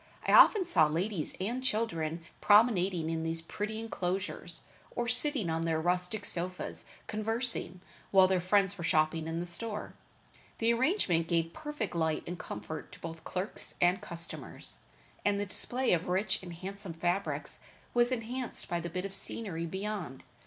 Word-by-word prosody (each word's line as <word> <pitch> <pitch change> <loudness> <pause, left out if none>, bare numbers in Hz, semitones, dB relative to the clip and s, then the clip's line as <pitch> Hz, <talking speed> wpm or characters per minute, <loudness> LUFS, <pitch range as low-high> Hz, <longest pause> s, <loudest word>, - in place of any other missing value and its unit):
I - - +3
often 405 -4 +8
saw 160 - +5
ladies 170 +2 -2
and 235 +7 -2
children 170 -9 -1 0.2
promenading 195 -6 +4
in 165 0 -1
these 165 0 -2
pretty 215 +5 -4
inclosures, 195 -4 -3 0.3
or 240 - -1
sitting 270 - +4
on 165 0 0
their 165 -1 +1
rustic 180 +5 0
sofas 180 +1 -1 0.2
conversing, 225 -4 -1 0.3
while 190 -1 +7
their 185 -1 +2
friends 195 +1 +2
were - - -4
shopping 155 0 +2
in 165 +1 -2
the 175 - -2
store. 210 +5 -4 0.6
The 230 +1 +3
arrangement 235 - +2
gave 165 0 0
perfect 295 - -4
light 160 -2 0
and 175 +1 -5
comfort 105 +10 -6
to - - -12
both 165 -1 -7
clerks 185 +2 -4
and 180 +2 +3
customers, 170 -1 -7 0.5
and 205 0 +2
the 205 - -1
display 245 +6 +1
of 170 0 0
rich 190 +2 +1
and 180 -2 -8
handsome 190 +1 -6
fabrics 175 +4 -2 0.3
was 240 +1 +3
enhanced 250 +1 -3
by 175 - -1
the 170 +1 -4
bit 180 +3 -3
of 195 - -5
scenery 175 -6 -1
beyond. 190 -7 -4
185 Hz, 160 wpm, -31 LUFS, 165-215 Hz, 0.6 s, often